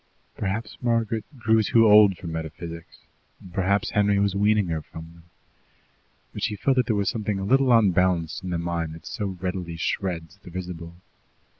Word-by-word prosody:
Perhaps 105 +1 -4
Margaret 115 -2 0
grew 110 -1 +3
too 115 +2 +4
old 105 -3 +7
for - - -12
metaphysics, 80 +1 -7 0.5
perhaps 100 +2 +1
Henry 105 -1 +2
was 100 -1 +1
weaning 105 +1 +2
her 80 -1 -2
from 80 +1 -11
them, 85 0 -18 1.1
but - - -7
she 105 - -1
felt 130 +6 +1
that 125 -2 +2
there 110 - +1
was 100 -1 0
something 105 -3 -1
a 95 - -3
little 135 +3 +3
unbalanced 90 -7 +2
in 90 - -5
the 90 - -1
mind 85 -2 -3
that 80 - -14
so 105 -5 -4
readily 90 -2 -4
shreds 85 -1 -3
the - - -12
visible. 85 -2 -7
95 Hz, 170 wpm, -25 LUFS, 85-105 Hz, 1.1 s, old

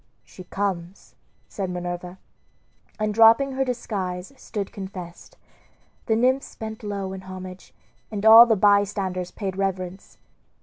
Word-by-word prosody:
"She 185 - -13
comes," 190 -2 -4 0.3
said 195 -2 -4
Minerva; 180 0 -5 0.8
and 215 0 -1
dropping 230 +5 +6
her 270 0 0
disguise 195 -6 -4
stood 205 -6 -6
confessed. 190 -3 -9 0.7
The 220 - +2
nymphs 255 +4 +1
bent 220 0 -7
low 200 -2 -4
in 190 - -7
homage, 185 0 -10 0.4
and 210 -1 -4
all 225 +2 +10
the 225 - +3
bystanders 195 -3 +1
paid 195 -2 -5
reverence. 190 -1 -4
195 Hz, 125 wpm, -24 LUFS, 185-220 Hz, 0.8 s, all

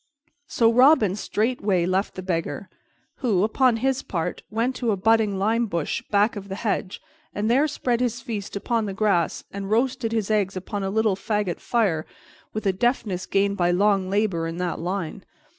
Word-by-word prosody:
So 230 -2 +3
Robin 250 - +5
straightway 210 -4 0
left 185 +3 0
the 185 - -6
Beggar, 180 +1 -3 0.5
who, 210 -8 +1
upon 235 +2 +3
his 265 +2 0
part, 165 -3 -3
went 230 +4 -1
to 240 - -1
a 205 - +1
budding 220 0 +2
lime 225 +4 +1
bush 170 -6 -2
back 205 +3 +3
of 200 -1 -7
the 195 - -4
hedge, 200 -3 -2 0.4
and 210 +3 0
there 275 +5 +4
spread 245 -5 -1
his 240 -2 -1
feast 210 -6 -5
upon 225 +2 -1
the 195 - -5
grass 195 -5 +1
and 195 0 -5
roasted 240 +1 +1
his 220 -2 -1
eggs 195 -3 +1
upon 200 +2 -4
a 195 - -1
little 215 -1 +2
fagot 200 -2 -2
fire, 195 -10 0 0.4
with 215 0 -5
a 195 - +3
deftness 205 -3 -1
gained 200 0 +1
by 175 -2 +2
long 195 +1 +2
labor 195 -5 0
in 165 +1 -5
that 180 -1 -2
line. 175 -1 -4
205 Hz, 180 wpm, -24 LUFS, 190-230 Hz, 0.5 s, Robin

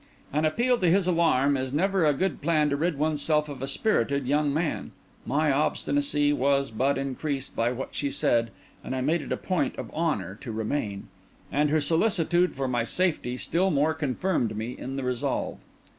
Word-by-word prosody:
An 150 +2 +2
appeal 240 +10 +2
to 180 - +3
his 190 +2 +3
alarm 160 -6 +3
is 130 -1 -2
never 185 +3 +2
a 150 - +4
good 185 -1 -1
plan 155 -1 +2
to - - +2
rid 160 +1 0
oneself 150 0 +1
of 140 -3 -8
a 135 - -2
spirited 140 - +1
young 145 +2 +2
man. 155 +2 -2 0.3
My 150 +3 +2
obstinacy 145 0 +1
was 140 -1 +1
but 130 +6 +1
increased 135 0 -3
by 115 +1 +1
what 125 +2 -4
she 140 - -1
said, 115 -4 +1 0.3
and 130 - -4
I 130 - -1
made 155 +5 +1
it - - -8
a - - 0
point 185 -3 -1
of - - -7
honour 150 - -1
to 120 - -6
remain. 110 -2 -3 0.4
And 150 +1 +2
her 155 +1 +2
solicitude 175 +2 +2
for 135 0 -2
my 120 -2 0
safety 150 -4 0
still 180 +8 +1
more 155 -1 +2
confirmed 145 - -1
me 115 +3 -4
in 135 +1 -6
the 135 - -3
resolve. 125 -1 -2
145 Hz, 190 wpm, -27 LUFS, 130-160 Hz, 0.4 s, a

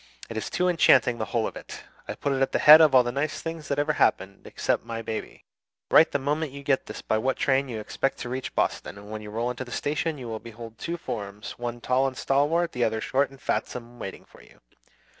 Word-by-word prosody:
It - - -6
is 110 - -3
too 180 0 0
enchanting, 130 -8 +4
the 110 - -1
whole 115 -1 -1
of - - -5
it. - - -9 0.2
I - - -4
put 140 - -1
it 135 - -1
at 135 - +1
the - - +3
head 155 +2 +9
of 150 -4 +5
all 125 - +7
the 120 - -2
nice 140 +4 -2
things 165 -2 -6
that 140 - -1
ever 145 +1 +1
happened, 100 -8 0
except - - -1
my 115 0 -5
baby. 110 0 -6 0.5
Write 160 - +7
the - - +1
moment 145 +2 -1
you 140 0 -9
get 135 -2 +1
this - - -8
by 110 - +1
what 130 +3 0
train 135 0 +1
you 115 -3 -4
expect 135 +5 -2
to 120 - -5
reach 130 +1 -5
Boston, - - -1
and 105 +1 -11
when 110 0 -5
you 105 - -9
roll 115 +3 -2
into 125 +1 -5
the 125 - -12
station 155 +4 -1
you 125 -3 -7
will 110 -1 -4
behold 115 0 -11
two 170 +1 -3
forms, 105 -9 -6
one 120 0 -4
tall 130 +3 +2
and 130 -1 -6
stalwart, 150 +6 +1
the 125 - -1
other 110 -1 0
short 135 +5 +1
and 135 0 -16
fatsome, 120 -2 -4
waiting 95 - -7
for - - -18
you. - - -20
130 Hz, 250 wpm, -26 LUFS, 115-145 Hz, 0.5 s, head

